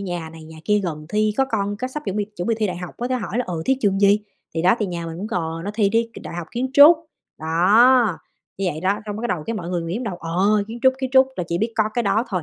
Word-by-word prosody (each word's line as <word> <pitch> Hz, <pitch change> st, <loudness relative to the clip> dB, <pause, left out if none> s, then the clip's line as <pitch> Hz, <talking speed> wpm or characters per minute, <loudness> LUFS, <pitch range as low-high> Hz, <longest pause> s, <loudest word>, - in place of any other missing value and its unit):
nhà 175 Hz, -4 st, -5 dB
này 160 Hz, -1 st, -12 dB
nhà 160 Hz, 0 st, -12 dB
kia 210 Hz, 0 st, +3 dB
gần 155 Hz, -5 st, -5 dB
thi 215 Hz, +2 st, +1 dB
có 270 Hz, -, +3 dB
con 205 Hz, -4 st, -2 dB
cái 255 Hz, +4 st, -4 dB
sắp 300 Hz, +3 st, -6 dB
chuẩn 195 Hz, -, -3 dB
bị 210 Hz, -, 0 dB
chuẩn 175 Hz, -, -3 dB
bị 230 Hz, -, +2 dB
thi 215 Hz, -, +1 dB
đại 180 Hz, -3 st, -4 dB
học 180 Hz, -1 st, -8 dB
có 245 Hz, -, -2 dB
thể 255 Hz, -, 0 dB
hỏi 220 Hz, -1 st, -3 dB
là 250 Hz, -, 0 dB
"Ừ, 165 Hz, -3 st, -4 dB
thi 265 Hz, -, +2 dB
trường 195 Hz, -2 st, +1 dB
gì?" 205 Hz, +1 st, +5 dB, 0.3 s
Thì 165 Hz, -, -1 dB
đó, 185 Hz, -, +5 dB
thì 210 Hz, -, -1 dB
nhà 170 Hz, -2 st, -5 dB
mình 165 Hz, 0 st, -6 dB
cũng 200 Hz, -, -4 dB
cò 165 Hz, -5 st, -3 dB
nó 205 Hz, -, -3 dB
thì 210 Hz, -3 st, +2 dB
đi 230 Hz, +2 st, +1 dB
k -, -, -13 dB
Đại -, -, -8 dB
học 175 Hz, -1 st, -5 dB
Kiến 255 Hz, +3 st, -2 dB
trúc, 295 Hz, +4 st, +9 dB, 0.4 s
đó, 205 Hz, +7 st, +4 dB, 0.4 s
như 195 Hz, -, -2 dB
vậy 155 Hz, -, -7 dB
đó. 185 Hz, +2 st, +1 dB, 0.2 s
Xong 205 Hz, -1 st, -4 dB
cái 220 Hz, -, -6 dB
bắt -, -, 0 dB
đầu 160 Hz, -, -7 dB
cái 230 Hz, -, -2 dB
mọi 175 Hz, -5 st, -5 dB
người 175 Hz, -2 st, -1 dB
nghĩ 165 Hz, +1 st, -4 dB
trong 250 Hz, -, -4 dB
đầu: 195 Hz, -6 st, -4 dB
"Ờ, 190 Hz, +6 st, +1 dB
Kiến 230 Hz, -, -7 dB
trúc, 260 Hz, -, +6 dB
Kiến 260 Hz, -1 st, -3 dB
trúc" 265 Hz, 0 st, +6 dB
là 180 Hz, -, -2 dB
chỉ 170 Hz, -, -1 dB
biết 225 Hz, +4 st, -1 dB
có 220 Hz, -, +2 dB
cái 240 Hz, -, +1 dB
đó 220 Hz, +2 st, +1 dB
thôi, 185 Hz, -5 st, -2 dB
200 Hz, 320 wpm, -22 LUFS, 175-230 Hz, 0.4 s, trúc